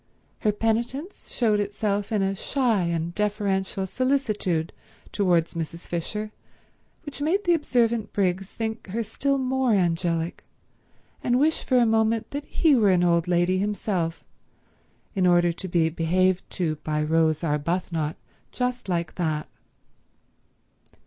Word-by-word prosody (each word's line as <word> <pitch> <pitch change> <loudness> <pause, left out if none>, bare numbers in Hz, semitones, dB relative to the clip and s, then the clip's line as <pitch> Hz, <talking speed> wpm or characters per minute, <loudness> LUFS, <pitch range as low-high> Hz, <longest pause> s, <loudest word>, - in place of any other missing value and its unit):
Her 215 - +2
penitence 235 - -2
showed 215 -4 +1
itself 205 0 -1
in 210 -3 +1
a 195 0 +1
shy 230 -2 +1
and 170 0 -2
deferential 200 -2 -1
solicitude 210 - 0 0.4
towards 175 -5 +2
Mrs. 165 +1 -5
Fisher 210 +5 -4 0.7
which 290 -1 -7
made 360 +8 +1
the 350 - +3
observant 235 -8 +1
Briggs 190 -1 0
think 220 -1 -4
her 225 +5 -2
still 275 +5 0
more 260 -2 +1
angelic, 170 -2 0 0.8
and 245 0 +2
wish 315 +3 +2
for 255 - +2
a 240 - +5
moment 225 0 +1
that 285 +1 -4
he 310 -4 +3
were 215 -5 +4
an 180 -2 +4
old 170 -1 +2
lady 180 +1 +2
himself 195 -4 -2 0.9
in 190 -4 +2
order 175 -1 +4
to 190 - -7
be 170 -2 +2
behaved 180 +3 +1
to 160 -5 -2
by 150 0 -2
Rose 160 0 +2
Arbuthnot 160 0 -1 0.4
just 250 -4 -2
like 170 -2 -1
that. 155 -3 -1
195 Hz, 135 wpm, -25 LUFS, 170-230 Hz, 0.9 s, a